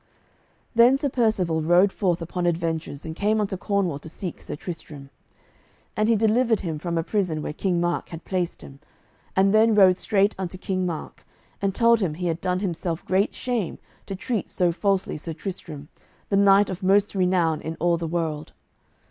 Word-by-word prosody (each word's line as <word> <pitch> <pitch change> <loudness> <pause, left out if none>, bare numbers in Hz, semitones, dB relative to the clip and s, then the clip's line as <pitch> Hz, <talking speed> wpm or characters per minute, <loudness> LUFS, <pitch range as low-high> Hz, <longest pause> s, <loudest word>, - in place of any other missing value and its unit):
Then 240 +3 +6
Sir 285 0 -1
Percivale 210 -10 +1
rode 175 +5 +4
forth 175 -4 0
upon 175 +1 -2
adventures, 165 -3 -2
and 160 0 -5
came 210 +4 +1
unto 200 -2 -1
Cornwall 185 -6 -1
to 160 - -10
seek 175 +1 -7
Sir - - -6
Tristram. 145 -4 -8 0.8
And 215 +1 +1
he 230 - +5
delivered 225 +1 +2
him 160 -5 -4
from 170 +1 -3
a 165 - +1
prison 175 -6 -1
where - - -4
King 180 +1 0
Mark 175 0 -1
had 165 -1 -9
placed 180 -3 -2
him, 135 0 -12 0.6
and 195 +1 +4
then 220 0 +5
rode 190 -3 +6
straight 205 -1 +2
unto 185 -1 -4
King 185 -1 -2
Mark 165 -3 -6 0.4
and 195 -1 0
told 230 -1 +4
him 175 -7 -1
he 180 +2 -4
had 170 -1 -1
done 180 0 -1
himself 170 -3 -3
great 190 +3 +1
shame 240 -7 -2 0.3
to 195 - -4
treat 220 +3 -3
so 180 -2 +1
falsely 195 +1 0
Sir 165 +2 -5
Tristram, 160 -5 -7 0.4
the 200 - +1
knight 200 0 +5
of 185 +1 -6
most 195 +2 +3
renown 180 -5 +1
in 160 +1 -5
all 170 0 +2
the 165 0 -4
world. 160 -2 -3
185 Hz, 185 wpm, -24 LUFS, 165-200 Hz, 0.8 s, Then